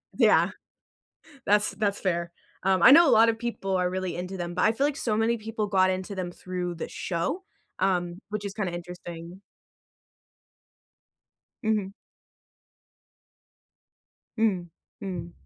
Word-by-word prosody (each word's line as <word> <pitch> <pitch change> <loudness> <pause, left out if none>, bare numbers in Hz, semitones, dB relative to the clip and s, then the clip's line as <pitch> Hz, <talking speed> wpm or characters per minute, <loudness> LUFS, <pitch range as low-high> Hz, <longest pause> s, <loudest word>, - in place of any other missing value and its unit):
Yeah, - - +5 1.0
that's 210 +1 +3
that's 205 -2 -1
fair. 170 -2 -1 0.3
Um, 190 -1 +2
I - - +10
know 330 +1 +8
a - - +5
lot 225 +1 +7
of 225 - +1
people 210 -5 -2
are 180 0 +1
really 185 -1 -3
into 180 +2 -5
them, 175 -1 -4
but - - +1
I 220 - +5
feel 275 +5 +1
like 290 -1 -2
so 215 -3 0
many 230 +2 +1
people 220 0 -3
got 185 -2 +3
into 185 +2 -3
them 180 -2 -3
through 180 -1 -4
the 165 - -5
show, 180 - -3 0.4
um, 180 -2 0
which 210 0 -4
is 200 - -4
kinda 195 -5 -2
interesting. 175 0 -8 2.2
Mhm. 210 -3 0 2.5
Mm, 190 -6 +1 0.4
mm. 170 -3 -5
190 Hz, 140 wpm, -27 LUFS, 175-215 Hz, 2.5 s, I